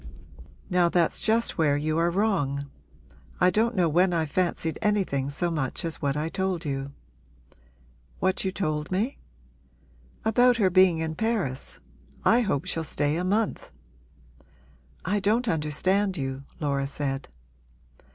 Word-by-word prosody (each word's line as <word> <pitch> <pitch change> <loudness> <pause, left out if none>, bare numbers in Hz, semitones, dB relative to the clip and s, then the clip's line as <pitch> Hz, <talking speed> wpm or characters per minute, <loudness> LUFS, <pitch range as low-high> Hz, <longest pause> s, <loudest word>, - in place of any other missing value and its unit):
'Now 180 -2 +3
that's 170 -1 +1
just 225 -3 +1
where 145 -3 +3
you 155 +2 0
are 170 +1 +3
wrong. 170 -8 0 0.7
I 180 +1 +5
don't 225 +5 +1
know 180 -3 +3
when 175 +3 +3
I've 160 -3 -1
fancied 170 -3 -1
anything 190 -11 0
so 170 +4 -1
much 150 -1 -2
as 165 -2 -4
what 140 0 0
I 155 +2 -1
told 185 -1 -2
you.' 135 -1 -3 1.3
'What 185 0 0
you 190 - -1
told 155 -5 -2
me?' 215 +9 -1 1.1
'About 245 +2 +4
her 195 -5 +3
being 185 -2 +5
in 160 0 -2
Paris. 185 - -2 0.5
I 235 - +5
hope 190 - -1
she'll 165 - -2
stay 145 -1 0
a 175 - -1
month!' 210 +4 -1 1.4
'I 205 +4 +1
don't 220 +5 +1
understand 185 +4 +1
you,' 135 -1 -4
Laura 140 -3 -1
said. 140 -1 -4
170 Hz, 140 wpm, -26 LUFS, 150-195 Hz, 1.4 s, I